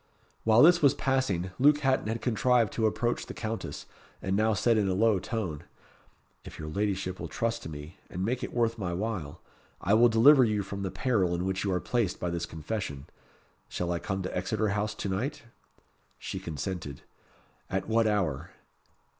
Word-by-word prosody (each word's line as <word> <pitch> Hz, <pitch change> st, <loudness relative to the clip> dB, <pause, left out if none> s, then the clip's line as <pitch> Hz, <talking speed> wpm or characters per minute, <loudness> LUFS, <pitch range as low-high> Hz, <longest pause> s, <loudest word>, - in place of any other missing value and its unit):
While 110 Hz, +2 st, +6 dB
this 170 Hz, +2 st, +7 dB
was 140 Hz, -3 st, +5 dB
passing, 115 Hz, -, 0 dB
Luke 145 Hz, +2 st, +5 dB
Hatton 135 Hz, -5 st, +1 dB
had 115 Hz, +1 st, -3 dB
contrived 120 Hz, -2 st, +2 dB
to 110 Hz, -1 st, +2 dB
approach 120 Hz, +2 st, -1 dB
the -, -, -7 dB
Countess, 110 Hz, 0 st, -5 dB, 0.3 s
and 95 Hz, +1 st, -1 dB
now 110 Hz, +1 st, +2 dB
said 115 Hz, +5 st, +3 dB
in 105 Hz, -2 st, +2 dB
a 95 Hz, -, 0 dB
low 110 Hz, -1 st, +3 dB
tone 90 Hz, -7 st, -4 dB, 0.8 s
"If -, -, -10 dB
your 75 Hz, -1 st, -6 dB
ladyship 95 Hz, 0 st, -2 dB
will -, -, -4 dB
trust 115 Hz, 0 st, -2 dB
to -, -, -7 dB
me, 75 Hz, +3 st, -9 dB
and 90 Hz, +2 st, -3 dB
make 125 Hz, +3 st, -1 dB
it -, -, -4 dB
worth 115 Hz, -1 st, 0 dB
my 90 Hz, -3 st, -2 dB
while, 90 Hz, -6 st, -4 dB, 0.4 s
I 100 Hz, -, +1 dB
will 120 Hz, +2 st, +6 dB
deliver 130 Hz, +5 st, +7 dB
you 105 Hz, -3 st, +1 dB
from 100 Hz, +1 st, -6 dB
the 95 Hz, -, -2 dB
peril 100 Hz, -7 st, +1 dB
in 90 Hz, +1 st, -2 dB
which 95 Hz, 0 st, -1 dB
you 100 Hz, -, 0 dB
are 90 Hz, -, +1 dB
placed 110 Hz, -3 st, -1 dB
by 90 Hz, -, -2 dB
this 85 Hz, 0 st, -3 dB
confession. 80 Hz, -4 st, -5 dB, 0.6 s
Shall 90 Hz, 0 st, -2 dB
I 85 Hz, -, -1 dB
come 95 Hz, 0 st, -3 dB
to 95 Hz, -, -4 dB
Exeter 105 Hz, +4 st, 0 dB
House 105 Hz, +1 st, -1 dB
to -, -, -4 dB
night?" 135 Hz, +10 st, -3 dB, 0.7 s
She -, -, -5 dB
consented. 80 Hz, -2 st, -5 dB, 0.7 s
"At 95 Hz, -, -2 dB
what 115 Hz, 0 st, +3 dB
hour?" 95 Hz, -10 st, -1 dB
105 Hz, 190 wpm, -29 LUFS, 90-115 Hz, 0.8 s, this